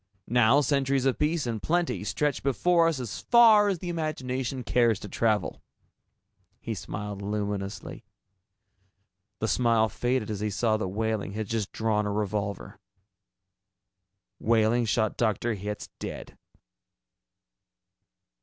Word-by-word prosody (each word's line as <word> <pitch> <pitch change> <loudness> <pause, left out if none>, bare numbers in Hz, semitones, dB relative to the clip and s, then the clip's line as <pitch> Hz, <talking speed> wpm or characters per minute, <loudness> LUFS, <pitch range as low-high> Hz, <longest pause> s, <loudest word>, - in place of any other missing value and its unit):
Now 120 +4 +4
centuries 140 -1 +1
of 135 - +1
peace 155 0 +1
and 115 -3 -3
plenty 175 +1 0
stretch 150 -3 -1
before 165 +5 +3
us 160 -5 0
as 115 -7 -5
far 225 -3 +6
as 190 - 0
the 175 +1 -6
imagination 135 -5 -3
cares 120 -2 +2
to - - -7
travel." 105 -2 0 1.0
He 115 - -4
smiled 100 +1 -6
luminously. 100 -1 -4 1.3
The 110 - -2
smile 115 -2 +2
faded 120 0 -1
as 105 - -3
he 105 +1 -1
saw 110 +2 +1
that 110 - -2
Wehling 110 0 -2
had 110 +1 -3
just 110 -1 -3
drawn 105 -2 0
a - - -1
revolver. 100 -1 -3 1.6
Wehling 115 +1 +2
shot 110 0 0
Dr. 115 +1 0
Hitz 105 +1 -6
dead. - - -7
115 Hz, 125 wpm, -27 LUFS, 105-135 Hz, 1.6 s, far